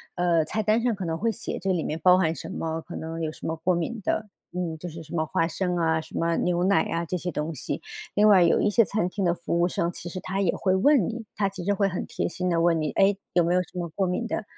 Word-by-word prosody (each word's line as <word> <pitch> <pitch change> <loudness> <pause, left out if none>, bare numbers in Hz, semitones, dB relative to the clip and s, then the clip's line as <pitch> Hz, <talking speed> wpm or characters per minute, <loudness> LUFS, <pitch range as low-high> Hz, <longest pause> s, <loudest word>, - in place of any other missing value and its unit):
呃， 175 -2 +2
菜 215 +7 -1
单 215 +2 +3
上 245 -2 +2
可 195 -3 -5
能 160 0 -2
会 225 +5 +1
写 215 - -5
这 190 +1 0
里 170 -4 0
面 155 - -2
包 180 0 +7
含 165 -3 +1
什 130 - -7
么， 160 0 -3
可 175 - -10
能 165 +1 -5
有 155 - -1
什 - - -8
么 160 - -1
过 180 +3 +1
敏 205 +7 -3
的， 215 - -1 0.3
嗯， 175 -3 -3
就 175 +2 -6
是 165 +1 -8
什 160 - -8
么 160 -1 +1
花 165 +2 0
生 180 +1 -1
啊， 160 -1 +2
什 - - -9
么 165 0 +1
牛 175 0 +1
奶 195 -4 +4
啊 170 0 -2
这 180 - -2
些 180 +1 -3
东 155 +1 -3
西。 - - -3 0.3
另 210 +1 +5
外 195 -4 +7
有 170 - +4
一 - - +3
些 230 +3 +5
餐 205 -2 0
厅 195 +1 -3
的 170 - +3
服 170 0 -2
务 175 - +4
生， 170 -1 0
其 175 - -6
实 185 - -5
他 195 +2 -2
也 180 -4 +2
会 185 -1 +1
问 235 - +4
你， 230 0 -6
他 200 - +2
其 190 -2 -7
实 205 - +2
会 200 0 +2
很 180 - -3
贴 - - -2
心 180 +1 -2
地 170 - +2
问 165 -2 +3
你， 150 - -1
哎， 195 +1 +3 0.2
有 175 - +4
没 170 +1 +1
有 180 - +4
什 180 - -13
么 175 - -2
过 190 +4 -1
敏 180 +6 -1
的？ - - -2
175 Hz, 315 characters per minute, -26 LUFS, 165-195 Hz, 0.3 s, 包